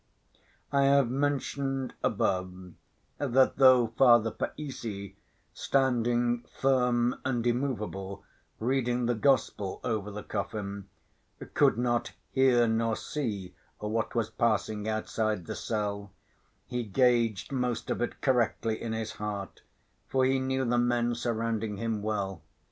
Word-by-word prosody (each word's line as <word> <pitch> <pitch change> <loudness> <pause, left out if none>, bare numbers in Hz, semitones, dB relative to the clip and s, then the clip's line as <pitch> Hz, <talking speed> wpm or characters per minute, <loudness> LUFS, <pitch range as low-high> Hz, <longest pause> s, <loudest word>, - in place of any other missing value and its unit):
I 140 -1 +3
have 140 -3 +4
mentioned 135 -1 -1
above, 90 -1 -1 0.5
that 130 -1 +3
though 130 -2 +7
Father 120 -3 +5
Païssy, 110 -11 -5 0.4
standing 120 -2 +1 0.2
firm 125 -2 +2
and 120 -3 -1
immovable 110 -6 -2 0.3
reading 125 0 0
the 120 - +2
Gospel 110 -5 +1
over 110 -4 -2
the 105 0 -7
coffin, 100 -1 -4 0.6
could - - +4
not 120 -1 0 0.2
hear 125 -3 +4
nor 115 0 +1
see 105 -13 -4 0.2
what 110 +2 -2
was 115 -2 0
passing 110 -2 0
outside 110 -3 -1
the - - -4
cell, 100 -2 -3 0.5
he 125 -1 -3
gauged 115 0 +2
most 125 -3 -1
of - - -2
it 120 - -3
correctly 115 -3 +1
in 115 -1 -3
his 110 -1 -3
heart, 105 -2 -5 0.5
for 130 -1 +2
he 135 0 +2
knew 130 0 0
the 120 0 +2
men 120 0 +1
surrounding 115 -3 -2
him, 115 -1 -2
well. 100 -4 -2
120 Hz, 120 wpm, -29 LUFS, 105-125 Hz, 0.6 s, though